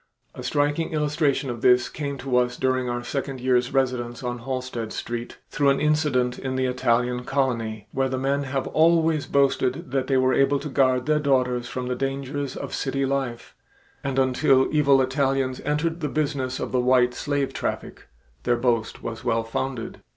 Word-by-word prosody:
A - - -8
striking 145 +3 0
illustration 150 -3 0
of 120 -1 -7
this 125 -1 +5
came 140 -1 -4
to 135 -1 -2
us 125 0 +1
during 130 -1 0
our 120 0 -3
second 135 +1 -4
year's 125 -1 +1
residence 125 -2 -1
on 120 0 -3
Halsted 125 -3 -4
Street 120 0 -5
through 145 -1 +2
an 135 - +2
incident 150 -5 +1
in 130 -1 -3
the 130 0 +1
Italian 125 -1 +1
colony, 115 -6 -1
where 135 0 0
the 130 - -2
men 140 +2 0
have 135 0 -2
always 160 -1 +3
boasted 135 -2 +1
that 135 -1 0
they 135 - +2
were 130 0 +3
able 140 +1 +3
to 150 - -6
guard 130 -2 +2
their 150 0 +2
daughters 125 -4 +1
from 125 +1 -4
the 125 - -1
dangers 135 +1 -3
of - - -6
city 135 0 -1
life, 135 -3 -3 0.5
and 135 -1 -2
until 130 0 +3
evil 140 -3 +4
Italians 135 -1 0
entered 155 +3 0
the 150 -3 -2
business 140 -3 -1
of - - -4
the 125 - +2
"white 125 0 +3
slave 140 +1 -2
traffic," - - -4 0.3
their 120 - +1
boast 120 -2 -1
was 115 -1 -5
well 115 -2 +1
founded. 115 +1 -4
130 Hz, 180 wpm, -24 LUFS, 125-140 Hz, 0.5 s, this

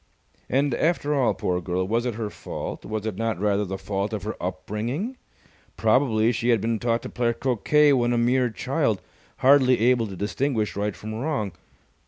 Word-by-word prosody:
And, 140 +1 +2
after 150 0 +1
all, 135 -4 +2
poor 90 0 -1
girl, 90 +1 -1
was 115 +4 0
it 120 - -2
her 110 -2 -4
fault? - - -6
Was 110 0 -4
it 110 -4 -3
not 115 -5 -1
rather 105 0 +1
the 95 0 -4
fault 100 +2 -3
of 105 -3 -3
her 110 - -3
upbringing? 110 - -3 0.6
Probably 115 -1 +3
she 120 0 -1
had 115 -2 +4
been 115 +2 -1
taught 115 0 0
to - - -6
play 120 -1 0
croquet 135 +5 +3
when 120 -2 +2
a 120 - +1
mere 125 +1 +2
child, 110 - 0 0.5
hardly 130 -2 +6
able 120 0 +3
to 95 - -7
distinguish 110 +3 -1
right 105 0 -2
from 110 +1 -7
wrong. 115 -4 -2
115 Hz, 185 wpm, -25 LUFS, 105-125 Hz, 0.6 s, hardly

